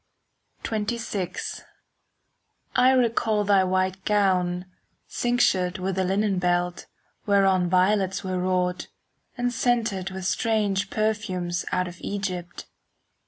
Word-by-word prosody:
XXVI 210 -4 -3 1.1
I 250 +1 +5
recall 230 -4 +2
thy 200 -2 +4
white 185 0 0
gown, 185 -3 +1 0.4
cinctured 200 -6 +1
With 190 0 -2
a - - +2
linen 195 +1 +1
belt, 175 0 0 0.4
whereon 195 -3 +3
Violets 190 +1 +2
were 185 -1 -2
wrought, 180 0 0 0.5
and 245 0 -1
scented 225 -6 0
With 190 -1 -6
strange 205 -1 0
perfumes 190 -5 -1
out 180 0 0
of 180 0 -9
Egypt. 185 -3 -4
190 Hz, 105 wpm, -25 LUFS, 180-210 Hz, 1.1 s, I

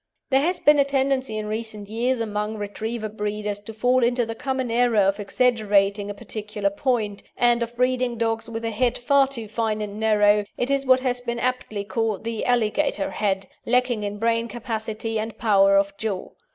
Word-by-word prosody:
There 265 +1 +4
has 355 +5 0
been 295 0 +5
a - - +7
tendency 270 -4 0
in 215 - -3
recent 215 -1 -4
years 235 +4 0
among 210 0 -2
Retriever 215 +2 -4
breeders 210 -1 -3
to 205 +2 -9
fall 245 +3 +2
into 245 0 +2
the 225 - -4
common 260 0 -2
error 240 -1 +2
of 195 0 +3
exaggerating 205 -2 +2
a 205 - -5
particular 210 -1 -3
point, 215 -3 -1 0.2
and 240 0 +3
of 235 0 -3
breeding 250 -1 +1
dogs 225 0 -1
with 230 0 -5
a 225 - -1
head 240 +2 +1
far 275 +2 +3
too 235 -5 -6
fine 220 0 -1
and 210 0 -5
narrow 210 -1 +4
it 245 +3 -1
is 275 -1 0
what 255 0 +5
has 250 -1 0
been 240 -1 -3
aptly 240 -4 -2
called 220 0 -2
the 230 -1 -3
alligator 240 -1 +1
head 195 -2 -1 0.2
lacking 250 -2 +2
in 205 0 -4
brain 230 +1 +1
capacity 225 -1 -4
and 220 0 -5
power 195 -3 +4
of 200 0 +1
jaw. 210 -4 -3
225 Hz, 190 wpm, -24 LUFS, 210-245 Hz, 0.2 s, a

